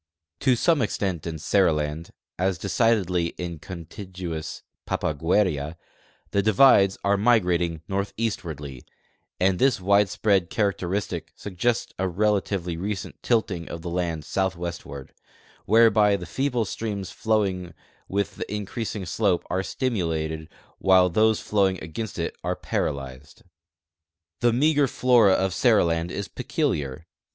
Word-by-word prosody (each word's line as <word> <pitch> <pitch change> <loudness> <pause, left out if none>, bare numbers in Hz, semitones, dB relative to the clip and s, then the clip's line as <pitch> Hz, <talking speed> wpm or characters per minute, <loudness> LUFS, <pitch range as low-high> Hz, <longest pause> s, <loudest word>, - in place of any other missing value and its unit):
To 130 -2 +3
some 160 +4 +2
extent 95 -7 -2
in 80 -1 -4
Seriland, 80 -3 +1 0.3
as 95 0 +1
decidedly 95 -3 +1
in 85 -3 -5
contigu 90 +1 -7
ous 80 0 -6 0.2
Papagueria, 80 -1 0 0.6
the 100 - +2
divides 100 -2 +5
are 100 0 +3
migrating 90 -7 +2
northeastwardly, 90 - -3 0.6
and 95 0 +2
this 135 -2 +4
widesi)read 100 -1 +2
characteristic 95 -5 -2
suggests 115 +5 -2
a 95 - +1
relatively 95 -2 0
recent 100 +2 -5
tilting 100 -8 0
of 85 -1 -7
the 85 - -4
land 85 -3 -2
southwestward, 85 -7 -4 0.5
whereby 110 -1 +5
the 90 -3 -5
feeble 125 - -1
streams 100 -1 -4
flowing 95 -6 -1 0.3
with 100 +1 -2
the - - -5
increasing 105 0 -4
sloi)e 95 -1 0
are 95 - +1
stimulated 80 - -2 0.3
while 95 -1 +5
those 110 +3 +3
flowing 95 -3 +1
against 95 +7 -5
it 85 - -3
are - - -1
paralyzed. 70 +1 -4 1.0
The 120 - +3
meager 145 +3 +3
flora 120 -7 +4
of 95 -1 +1
Seriland 85 -8 +2
is 100 +2 -4
peculiar. 70 +2 -2
95 Hz, 120 wpm, -25 LUFS, 85-105 Hz, 1.0 s, divides